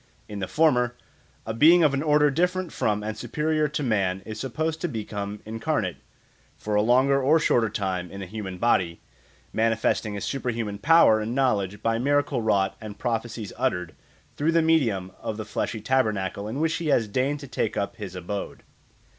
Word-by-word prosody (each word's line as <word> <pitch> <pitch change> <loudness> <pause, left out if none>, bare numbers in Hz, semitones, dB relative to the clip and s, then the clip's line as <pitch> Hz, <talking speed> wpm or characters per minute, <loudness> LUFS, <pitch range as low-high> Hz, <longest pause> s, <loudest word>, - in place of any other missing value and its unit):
In 105 -1 -6
the 95 - -3
former, 125 - +2 0.5
a 110 - -3
being 165 +9 +6
of 150 -3 +4
an 140 - 0
order 150 -1 +4
different 180 +3 0
from 105 -1 0
and 110 0 -3
superior 155 0 0
to 150 0 -3
man 95 -6 0
is 110 0 -7
supposed 155 +6 -2
to - - 0
become 105 -5 -5
incarnate, 110 - -2 0.6
for 105 - -4
a 105 - +4
longer 130 +5 +3
or 145 +5 +4
a - - +1
shorter 115 -7 +2
time, 95 -4 -3
in 100 - -9
a 100 - -5
human 95 -1 -6
body, 90 -6 +1 0.5
manifesting 110 -1 +1
his 100 - -4
super 135 -2 -2
human 110 -4 -3
power 150 -5 +6
and 115 +3 -3
knowledge 105 -7 0
by 115 0 +1
miracles 145 -1 +1
wrought 100 -3 +1
and 105 -1 -8
prophecies 115 -3 -3
uttered 90 -10 -1 0.4
through 160 +3 +1
the 165 -1 +4
medium 115 - +1
of 110 - -4
the 110 - -5
fleshly 110 +1 -3
tabernacle 105 -5 0
in 120 +6 -4
which 160 +1 +1
he 170 - -4
has 120 -6 +2
deigned 130 +7 0
to 140 - -9
take 120 -4 -2
up 100 - -2
his 95 -4 -7
abode. 95 +3 -5
115 Hz, 190 wpm, -25 LUFS, 105-145 Hz, 0.6 s, being